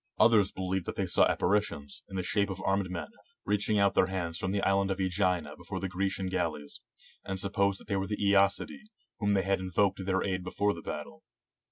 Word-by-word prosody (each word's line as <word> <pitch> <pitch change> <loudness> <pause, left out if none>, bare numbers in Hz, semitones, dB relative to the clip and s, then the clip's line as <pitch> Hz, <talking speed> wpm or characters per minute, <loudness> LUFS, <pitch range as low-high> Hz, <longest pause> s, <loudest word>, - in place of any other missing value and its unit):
Others 110 -3 +5
believed 95 -1 -2
that - - -3
they - - 0
saw - - +4
appa - - -1
ritions, 90 -8 0
in - - -8
the 95 - -1
shape 100 +3 +1
of 95 -1 -4
armed 95 -1 +1
men, 85 -4 -5 0.4
reaching 105 +1 +1
out 100 -1 +4
their 95 - +4
hands 85 -3 -3
from 95 - -2
the 100 0 -1
island 100 0 +2
of 95 - -1
^gina 95 -1 0
before - - -6
the 95 - -2
Grecian 95 +1 -2
gal 90 -3 0
leys; 75 -1 -9 0.4
and 95 -1 -3
supposed 100 0 0
they 100 -2 -1
were 95 0 -2
the 105 +1 -2
^acidae, 100 - +2 0.4
whom 100 -1 +2
they 95 - +2
had 95 +1 +1
invoked 95 +1 +1
to 95 - -5
their 95 0 0
aid 95 -2 -2
before 100 +3 0
the - - -8
battle. 70 - -6
95 Hz, 220 wpm, -30 LUFS, 95-100 Hz, 0.4 s, Others